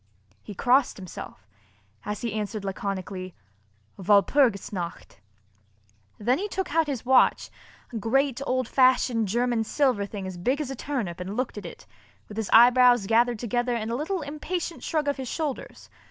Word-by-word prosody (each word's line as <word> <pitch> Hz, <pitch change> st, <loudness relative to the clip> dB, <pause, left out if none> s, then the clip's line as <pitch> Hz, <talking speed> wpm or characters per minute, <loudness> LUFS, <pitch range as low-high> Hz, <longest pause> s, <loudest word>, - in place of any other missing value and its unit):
He 205 Hz, -, -10 dB
crossed 255 Hz, +6 st, +2 dB
himself, 170 Hz, -, -10 dB, 0.6 s
as 210 Hz, 0 st, -4 dB
he 235 Hz, -3 st, -3 dB
answered 215 Hz, -1 st, -4 dB
laconically: 190 Hz, -1 st, -5 dB, 0.6 s
"Walpurgis 205 Hz, +3 st, +3 dB
nacht." 170 Hz, -, -6 dB, 1.0 s
Then 245 Hz, +7 st, +1 dB
he 410 Hz, -, -2 dB
took 380 Hz, -2 st, -4 dB
out 325 Hz, -1 st, +2 dB
his 265 Hz, -5 st, -4 dB
watch, 260 Hz, 0 st, +3 dB, 0.4 s
a -, -, -2 dB
great, 265 Hz, +4 st, +1 dB
old 255 Hz, -1 st, 0 dB
fashioned 255 Hz, -4 st, +3 dB
German 235 Hz, +2 st, 0 dB
silver 240 Hz, -4 st, +1 dB
thing 200 Hz, -2 st, -6 dB
as 185 Hz, -1 st, -6 dB
big 255 Hz, +11 st, 0 dB
as 285 Hz, -3 st, -3 dB
a -, -, -4 dB
turnip 235 Hz, -, -4 dB
and 190 Hz, +4 st, -5 dB
looked 255 Hz, 0 st, -2 dB
at 190 Hz, -, -8 dB
it, -, -, -12 dB, 0.4 s
with 210 Hz, -, -10 dB
his 220 Hz, -2 st, -2 dB
eyebrows 245 Hz, -1 st, +6 dB
gathered 235 Hz, +2 st, +3 dB
together 240 Hz, +2 st, -1 dB
and 225 Hz, 0 st, -3 dB
a -, -, -1 dB
little 320 Hz, +6 st, -2 dB
impatient 330 Hz, +4 st, -4 dB
shrug 310 Hz, -2 st, -1 dB
of 285 Hz, -, 0 dB
his 265 Hz, -1 st, -5 dB
shoulders. 300 Hz, 0 st, -5 dB
240 Hz, 165 wpm, -26 LUFS, 205-270 Hz, 1.0 s, eyebrows